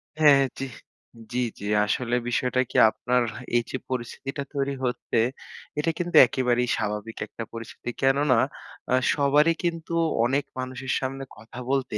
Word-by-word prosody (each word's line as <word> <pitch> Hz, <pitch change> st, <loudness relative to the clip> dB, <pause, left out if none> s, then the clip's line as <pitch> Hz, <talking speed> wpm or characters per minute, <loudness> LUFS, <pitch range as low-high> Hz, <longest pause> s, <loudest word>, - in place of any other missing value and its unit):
হ্যাঁ, 150 Hz, -2 st, +7 dB
হ্যাঁ, 135 Hz, -, +3 dB
জি। 135 Hz, -, -3 dB, 0.6 s
জি, 125 Hz, -, -1 dB, 0.2 s
জি, 100 Hz, -, -7 dB, 0.2 s
আসলে 120 Hz, +3 st, 0 dB
বিষয়টা 125 Hz, +1 st, +1 dB
কি, -, -, -2 dB
আপনার 125 Hz, +1 st, +1 dB, 0.3 s
এইযে 120 Hz, +2 st, -2 dB
পরিস্থিতিটা 130 Hz, +3 st, -4 dB
তৈরি 140 Hz, 0 st, -1 dB
হচ্ছে, 120 Hz, -1 st, -1 dB, 0.6 s
এটা 165 Hz, +2 st, +1 dB
কিন্তু 175 Hz, -1 st, -3 dB
একেবারেই 125 Hz, -1 st, +1 dB
স্বাভাবিক 105 Hz, +1 st, -3 dB
একটা 115 Hz, -, -7 dB
পরিস্থিতি। 115 Hz, +1 st, -6 dB
কেননা, 135 Hz, -1 st, +3 dB, 0.6 s
আ -, -, +6 dB, 0.2 s
সবারই 150 Hz, +3 st, +4 dB
কিন্তু 170 Hz, -1 st, -2 dB, 0.3 s
অনেক 135 Hz, +4 st, +1 dB
মানুষের 130 Hz, +1 st, -4 dB
সামনে 135 Hz, +1 st, -4 dB
কথা 110 Hz, +3 st, -11 dB
বলতে 130 Hz, -5 st, 0 dB
130 Hz, 140 wpm, -25 LUFS, 120-140 Hz, 0.6 s, হ্যাঁ